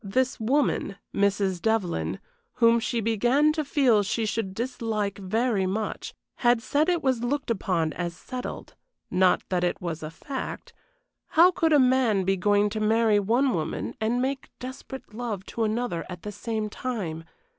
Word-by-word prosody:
This 255 Hz, +6 st, 0 dB
woman, 240 Hz, -4 st, +1 dB, 0.2 s
Mrs. 200 Hz, -2 st, +1 dB
Devlyn, 220 Hz, -6 st, 0 dB, 0.4 s
whom 230 Hz, -1 st, +4 dB
she 230 Hz, 0 st, -1 dB
began 240 Hz, +8 st, +3 dB
to 310 Hz, -1 st, -1 dB
feel 265 Hz, -7 st, +3 dB
she 220 Hz, +3 st, -1 dB
should 210 Hz, -3 st, -2 dB
dislike 225 Hz, -4 st, -2 dB
very 205 Hz, 0 st, 0 dB
much, 210 Hz, +3 st, -3 dB, 0.2 s
had 240 Hz, -1 st, +3 dB
said 295 Hz, +8 st, +1 dB
it 350 Hz, -2 st, +1 dB
was 260 Hz, -3 st, +1 dB
looked 275 Hz, 0 st, -1 dB
upon 175 Hz, -7 st, 0 dB
as 175 Hz, -1 st, -4 dB
settled, 255 Hz, +4 st, -7 dB, 0.4 s
not 185 Hz, 0 st, +3 dB
that 180 Hz, -1 st, 0 dB
it 175 Hz, -, 0 dB
was 170 Hz, -3 st, -4 dB
a 155 Hz, -, -5 dB
fact. 265 Hz, -, -6 dB, 0.5 s
How 345 Hz, +3 st, +6 dB
could 330 Hz, -2 st, +1 dB
a 300 Hz, -, +7 dB
man 250 Hz, -6 st, +3 dB
be 195 Hz, +1 st, +2 dB
going 205 Hz, +2 st, +2 dB
to 215 Hz, -, -3 dB
marry 220 Hz, 0 st, +3 dB
one 240 Hz, +6 st, +2 dB
woman 160 Hz, -2 st, -3 dB
and 230 Hz, +3 st, +1 dB
make 265 Hz, +1 st, -2 dB
desperate 260 Hz, -2 st, -8 dB
love 215 Hz, -5 st, -4 dB
to 230 Hz, -, -2 dB
another 215 Hz, -6 st, -1 dB
at 180 Hz, -2 st, -8 dB
the 210 Hz, -, -5 dB
same 215 Hz, +1 st, -3 dB
time? 205 Hz, -9 st, -4 dB
220 Hz, 165 wpm, -26 LUFS, 195-255 Hz, 0.5 s, a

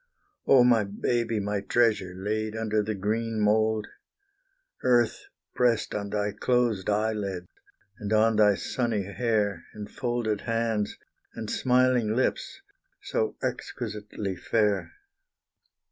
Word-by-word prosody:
Oh, 130 Hz, -3 st, +7 dB
my 120 Hz, -3 st, +4 dB
baby, 115 Hz, +3 st, -1 dB
my 100 Hz, 0 st, -2 dB
treasure, 110 Hz, -7 st, +1 dB
laid 110 Hz, +2 st, -2 dB
under 110 Hz, -1 st, 0 dB
the 110 Hz, +1 st, -3 dB
green 110 Hz, +3 st, -1 dB
mould! 110 Hz, +1 st, +2 dB, 1.0 s
Earth 120 Hz, -2 st, +2 dB, 0.3 s
pressed 120 Hz, -3 st, +1 dB
on 100 Hz, -1 st, -3 dB
thy 105 Hz, 0 st, -1 dB
closed 115 Hz, -2 st, 0 dB
eyelids, 105 Hz, -4 st, -1 dB, 0.5 s
and 105 Hz, -1 st, -5 dB
on 110 Hz, 0 st, +4 dB
thy 105 Hz, -2 st, +5 dB
sunny 115 Hz, -4 st, -1 dB
hair, 105 Hz, 0 st, -1 dB
And 105 Hz, -1 st, -6 dB
folded 120 Hz, -4 st, -1 dB
hands, 115 Hz, -2 st, -1 dB, 0.4 s
and 110 Hz, -, -5 dB
smiling 125 Hz, -3 st, +2 dB
lips, 130 Hz, -, -1 dB, 0.4 s
so -, -, -1 dB
exquisitely 105 Hz, -2 st, -4 dB
fair. 105 Hz, +1 st, 0 dB
110 Hz, 115 wpm, -27 LUFS, 105-115 Hz, 1.0 s, Oh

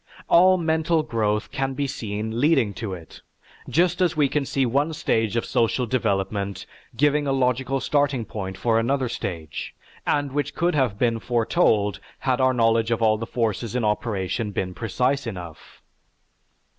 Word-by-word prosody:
All 185 Hz, +2 st, +6 dB
mental 160 Hz, -1 st, +1 dB
growth 105 Hz, -6 st, -1 dB
can 135 Hz, -1 st, -2 dB
be 140 Hz, +1 st, -1 dB
seen 110 Hz, -3 st, -4 dB
leading 135 Hz, -9 st, +3 dB
to 100 Hz, -3 st, -4 dB
it, 85 Hz, -2 st, -13 dB, 0.5 s
just 175 Hz, +3 st, +2 dB
as 175 Hz, -4 st, +2 dB
we 145 Hz, -2 st, +4 dB
can 145 Hz, 0 st, 0 dB
see 135 Hz, -1 st, +1 dB
one 140 Hz, +6 st, +1 dB
stage 110 Hz, -7 st, 0 dB
of 115 Hz, -, 0 dB
social 120 Hz, +2 st, +1 dB
development 100 Hz, -4 st, -1 dB, 0.3 s
giving 145 Hz, +2 st, +2 dB
a -, -, +1 dB
logical 130 Hz, 0 st, +1 dB
starting 140 Hz, -4 st, +1 dB
point 95 Hz, -3 st, -6 dB
for 115 Hz, -1 st, +2 dB
another 130 Hz, +3 st, 0 dB
stage, 85 Hz, -9 st, -5 dB, 0.3 s
and 145 Hz, -1 st, +1 dB
which 145 Hz, +1 st, -2 dB
could 175 Hz, +1 st, +1 dB
have 130 Hz, -9 st, +1 dB
been 115 Hz, -1 st, +1 dB
foretold 110 Hz, -3 st, +1 dB, 0.2 s
had 130 Hz, -1 st, 0 dB
our 130 Hz, 0 st, +4 dB
knowledge 115 Hz, -2 st, +2 dB
of 115 Hz, -1 st, 0 dB
all 110 Hz, -1 st, +3 dB
the 115 Hz, -, -4 dB
forces 115 Hz, -1 st, -2 dB
in 120 Hz, -3 st, 0 dB
operation 105 Hz, 0 st, -1 dB
been 95 Hz, -2 st, -3 dB
precise 125 Hz, +6 st, -1 dB
enough. 90 Hz, -7 st, -9 dB
120 Hz, 160 wpm, -24 LUFS, 105-140 Hz, 0.5 s, All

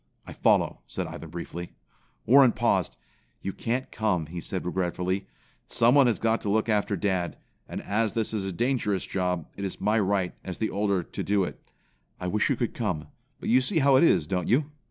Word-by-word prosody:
"I -, -, -9 dB
follow," -, -, +2 dB
said -, -, -4 dB
Ivan -, -, -8 dB
briefly. 85 Hz, +1 st, -7 dB, 0.5 s
Warren 130 Hz, 0 st, +7 dB
paused. -, -, +1 dB, 0.5 s
"You 95 Hz, -, -3 dB
can't 125 Hz, +3 st, -2 dB
come," 100 Hz, -7 st, 0 dB
he 85 Hz, +3 st, -6 dB
said 95 Hz, +1 st, -4 dB
regretfully. 90 Hz, +1 st, -1 dB, 0.4 s
"Someone 125 Hz, +3 st, +5 dB
has 115 Hz, -, +2 dB
got 115 Hz, 0 st, +1 dB
to 105 Hz, -, -3 dB
look 110 Hz, +3 st, +2 dB
after 105 Hz, -1 st, +1 dB
dad, 95 Hz, -2 st, -1 dB, 0.3 s
and -, -, -5 dB
as 105 Hz, 0 st, 0 dB
this 110 Hz, -1 st, -1 dB
is 105 Hz, -3 st, -1 dB
a 95 Hz, -, -2 dB
dangerous 105 Hz, -2 st, 0 dB
job, 90 Hz, -4 st, -1 dB
it 100 Hz, -, -6 dB
is 95 Hz, -, -4 dB
my 110 Hz, +2 st, +2 dB
right, 95 Hz, -2 st, +1 dB
as 95 Hz, -, -6 dB
the 110 Hz, -, -1 dB
older, 100 Hz, -2 st, 0 dB
to -, -, -6 dB
do 100 Hz, -1 st, +2 dB
it. -, -, -6 dB, 0.6 s
I -, -, -5 dB
wish 105 Hz, +4 st, +1 dB
you -, -, +2 dB
could -, -, -2 dB
come, 75 Hz, -1 st, -3 dB, 0.3 s
but -, -, -4 dB
you 125 Hz, +3 st, +5 dB
see 170 Hz, +7 st, 0 dB
how 140 Hz, -2 st, +5 dB
it 130 Hz, -, +6 dB
is, 120 Hz, -, +4 dB
don't 90 Hz, +1 st, -2 dB
you?" 145 Hz, +4 st, +2 dB
100 Hz, 200 wpm, -27 LUFS, 90-115 Hz, 0.6 s, Warren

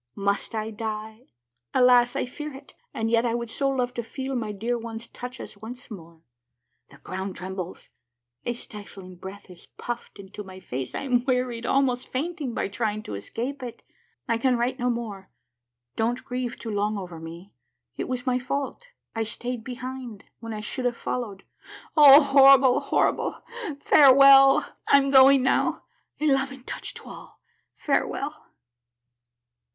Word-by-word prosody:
Must 200 Hz, +2 st, -1 dB
I 220 Hz, 0 st, -3 dB
die? 220 Hz, +2 st, -6 dB, 0.5 s
Alas, 245 Hz, -1 st, +5 dB
I -, -, 0 dB
fear 300 Hz, +4 st, -7 dB
it! 270 Hz, -, -13 dB, 0.2 s
and 225 Hz, 0 st, -2 dB
yet 230 Hz, 0 st, +3 dB
I 235 Hz, -1 st, 0 dB
would 235 Hz, -1 st, -4 dB
so 275 Hz, +2 st, 0 dB
love 250 Hz, -2 st, -1 dB
to 240 Hz, -, -3 dB
feel 265 Hz, +4 st, -5 dB
my 220 Hz, -4 st, -2 dB
dear 225 Hz, +4 st, -2 dB
ones' 230 Hz, 0 st, -6 dB
touches 245 Hz, -4 st, -9 dB
once 245 Hz, +3 st, -10 dB
more! 165 Hz, -4 st, -11 dB, 0.7 s
The -, -, -16 dB
ground 190 Hz, +1 st, -6 dB
trembles; 185 Hz, -1 st, -7 dB, 0.5 s
a 240 Hz, -, -1 dB
stifling 200 Hz, -6 st, -10 dB
breath 190 Hz, +3 st, -10 dB
is 175 Hz, -, -14 dB
puffed 240 Hz, -2 st, -6 dB
into 200 Hz, +1 st, -9 dB
my 190 Hz, -1 st, -11 dB
face; 130 Hz, -8 st, -5 dB
I -, -, -2 dB
am 250 Hz, -3 st, +1 dB
wearied, 250 Hz, -3 st, -1 dB
almost 260 Hz, -2 st, +1 dB
fainting, 285 Hz, -3 st, -3 dB
by -, -, -1 dB
trying 215 Hz, +1 st, -2 dB
to -, -, -7 dB
escape 235 Hz, -, -5 dB
it. 245 Hz, -2 st, -8 dB, 0.4 s
I 230 Hz, 0 st, +1 dB
can 250 Hz, 0 st, +2 dB
write 245 Hz, +2 st, -1 dB
no 245 Hz, 0 st, +1 dB
more. 220 Hz, -5 st, -4 dB, 0.7 s
Don't 235 Hz, +3 st, -1 dB
grieve 250 Hz, -1 st, -4 dB
too 225 Hz, -, -6 dB
long 210 Hz, +1 st, 0 dB
over 180 Hz, -4 st, -7 dB
me. 170 Hz, +4 st, -10 dB, 0.4 s
It -, -, -4 dB
was 250 Hz, -1 st, -3 dB
my 250 Hz, -1 st, +1 dB
fault. 280 Hz, -, -4 dB, 0.3 s
I 225 Hz, -, -2 dB
stayed 235 Hz, +2 st, -4 dB
behind, 250 Hz, -3 st, -7 dB, 0.2 s
when 230 Hz, 0 st, -7 dB
I 215 Hz, -1 st, -5 dB
should 250 Hz, +4 st, -4 dB
have 240 Hz, -1 st, 0 dB
followed. 210 Hz, -6 st, -4 dB, 0.5 s
Oh, 290 Hz, -1 st, +9 dB
horrible, 275 Hz, -2 st, +6 dB
horrible! -, -, 0 dB, 0.4 s
Farewell! 275 Hz, -1 st, +7 dB, 0.2 s
I'm 275 Hz, -1 st, +4 dB
going 270 Hz, 0 st, +7 dB
now. 260 Hz, -, +1 dB, 0.4 s
A 305 Hz, -, -1 dB
loving 270 Hz, -2 st, +1 dB
touch -, -, -6 dB
to -, -, -10 dB
all -, -, -12 dB, 0.2 s
— -, -, -49 dB
farewell 295 Hz, +2 st, -1 dB
240 Hz, 160 wpm, -25 LUFS, 210-260 Hz, 0.7 s, Oh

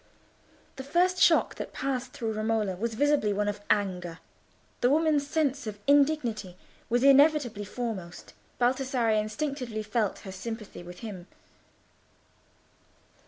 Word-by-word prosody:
The 265 Hz, -, -5 dB
first 360 Hz, +6 st, +2 dB
shock -, -, +5 dB
that -, -, -6 dB
passed 260 Hz, -2 st, -3 dB
through 225 Hz, -3 st, -3 dB
Romola 215 Hz, -3 st, 0 dB
was 225 Hz, +4 st, -3 dB
visibly 290 Hz, -4 st, +2 dB
one 205 Hz, +1 st, -1 dB
of 205 Hz, 0 st, -3 dB
anger. 180 Hz, -5 st, 0 dB, 0.6 s
The 245 Hz, -, +3 dB
woman's 300 Hz, -1 st, +2 dB
sense 285 Hz, -4 st, 0 dB
of 210 Hz, -1 st, -5 dB
indignity 265 Hz, -, +2 dB, 0.3 s
was 240 Hz, +2 st, +2 dB
inevitably 275 Hz, -6 st, +4 dB
foremost. 205 Hz, -6 st, -6 dB, 0.3 s
Baldassarre 250 Hz, -1 st, +1 dB
instinctively 240 Hz, -1 st, -4 dB
felt 215 Hz, -1 st, -1 dB
her 195 Hz, -, -9 dB
in -, -, -7 dB
sympathy 215 Hz, 0 st, -7 dB
with 175 Hz, 0 st, -11 dB
him. 195 Hz, -6 st, -8 dB
235 Hz, 125 wpm, -28 LUFS, 205-275 Hz, 0.6 s, shock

